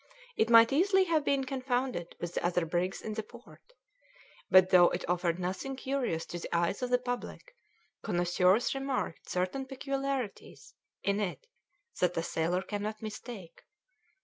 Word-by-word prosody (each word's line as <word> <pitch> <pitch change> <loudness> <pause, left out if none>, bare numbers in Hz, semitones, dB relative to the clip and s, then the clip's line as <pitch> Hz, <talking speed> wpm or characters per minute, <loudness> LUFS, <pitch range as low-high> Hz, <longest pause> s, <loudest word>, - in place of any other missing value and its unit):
It 225 - +2
might 230 +1 +7
easily 380 +5 +4
have 325 -4 +1
been 280 -1 +1
confounded 255 -8 -2
with 175 0 -5
the - - -2
other 175 -1 +1
brigs 175 +3 -2
in 215 - -4
the 220 - -2
port. 240 +3 -15 0.9
But 185 0 +6
though 175 -1 +7
it - - -4
offered 175 -1 0
nothing 185 +9 -3
curious 260 -11 -2
to 175 - -6
the - - -6
eyes 170 +5 0
of 250 - -1
the 250 - +4
public, 250 - -6 0.5
connoisseurs 180 +2 +2
remarked 270 -10 -3
certain 185 +10 -2
peculiarities 270 -3 -4 0.3
in 200 +1 +1
it 205 - -3 0.5
that 180 -1 +1
a 165 - 0
sailor 170 +3 -1
cannot 210 +2 -4
mistake. 215 -4 -8
215 Hz, 150 wpm, -31 LUFS, 180-265 Hz, 0.9 s, might